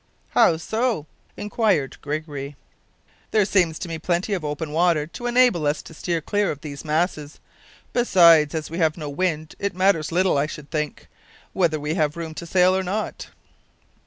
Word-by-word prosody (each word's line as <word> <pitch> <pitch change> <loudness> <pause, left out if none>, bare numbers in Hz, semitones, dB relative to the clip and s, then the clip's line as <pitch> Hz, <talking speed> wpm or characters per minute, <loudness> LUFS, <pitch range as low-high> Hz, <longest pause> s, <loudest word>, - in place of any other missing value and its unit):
"How 160 - +4
so?" 220 - -1 0.3
inquired 205 - 0
Gregory. 145 -1 -5 0.7
"There 215 -2 +3
seems 175 -6 +2
to 180 - -6
me 165 -1 -5
plenty 175 +5 -1
of 180 -5 -2
open 150 +1 -4
water 165 -1 +2
to 240 +9 -6
enable 240 -10 +3
us 145 +1 -1
to - - -12
steer 170 +1 -2
clear 205 +5 0
of 145 - -5
these 145 -2 -7
masses. 155 -1 -1 0.5
Besides, 170 -10 +5
as 155 -1 -4
we 165 - -4
have 160 -1 +2
no 150 -3 -5
wind, 155 -1 -2
it 200 -3 -2
matters 185 -5 +2
little, 180 -3 +2
I 145 - +1
should 150 -1 -9
think, 150 -2 -3 0.5
whether 165 -5 +1
we 150 +1 -2
have 155 -2 0
room 165 -1 -5
to 170 +2 -8
sail 185 +2 +4
or 190 - +1
not." 195 +4 -4
165 Hz, 175 wpm, -23 LUFS, 150-185 Hz, 0.7 s, Besides